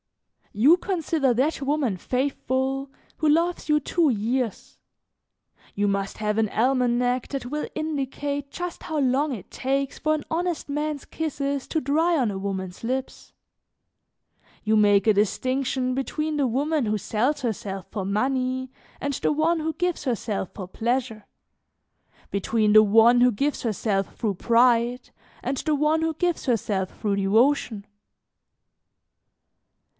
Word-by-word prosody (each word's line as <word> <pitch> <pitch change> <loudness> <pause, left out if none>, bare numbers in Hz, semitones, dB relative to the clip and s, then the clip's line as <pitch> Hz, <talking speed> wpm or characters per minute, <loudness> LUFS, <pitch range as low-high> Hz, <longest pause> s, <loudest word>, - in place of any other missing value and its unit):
"You 275 - +5
consider 325 -8 0
that 285 +5 0
woman 275 -6 0
faithful 265 +4 -1 0.3
who 310 - +2
loves 335 +2 +1
you 300 0 +4
two 320 +2 +1
years; 235 0 -2 1.0
you 205 0 +1
must 200 0 -1
have 210 0 -1
an 220 -2 +2
almanac 250 +1 +1
that 275 -3 -4
will 300 +4 -3
indicate 285 -2 -3
just 355 -1 -6
how 315 - -3
long 280 +2 +2
it 215 -9 -7
takes 275 +1 -2
for 310 0 +1
an 300 - -5
honest 345 0 -2
man's 295 0 -3
kisses 280 -3 -3
to 320 - 0
dry 320 +5 +2
on 245 -7 +1
a 190 - -4
woman's 190 -1 -5
lips. 260 +3 -4 1.3
You 220 0 +2
make 205 -2 +4
a 215 - +5
distinction 255 +5 0
between 305 +4 -2
the 285 -3 +1
woman 285 +2 0
who 215 0 +1
sells 250 +9 -1
herself 200 -6 -4
for 200 - -3
money 255 +5 -1 0.3
and 285 0 -2
the - - 0
one 320 +3 +2
who 320 +1 -1
gives 350 +2 -2
herself 220 -6 -2
for 190 -3 -6
pleasure, 235 0 -2 1.0
between 210 +2 +1
the 215 0 +9
one 225 +3 +5
who 250 0 +6
gives 280 +7 -1
herself 210 -3 -1
through 215 -3 -1
pride 235 +4 +2 0.3
and 270 - -2
the 305 +3 0
one 300 +2 +2
who 325 0 0
gives 350 +1 -1
herself 205 -6 -1
through 205 -2 0
devotion. 220 +1 +2
260 Hz, 140 wpm, -25 LUFS, 215-295 Hz, 1.3 s, the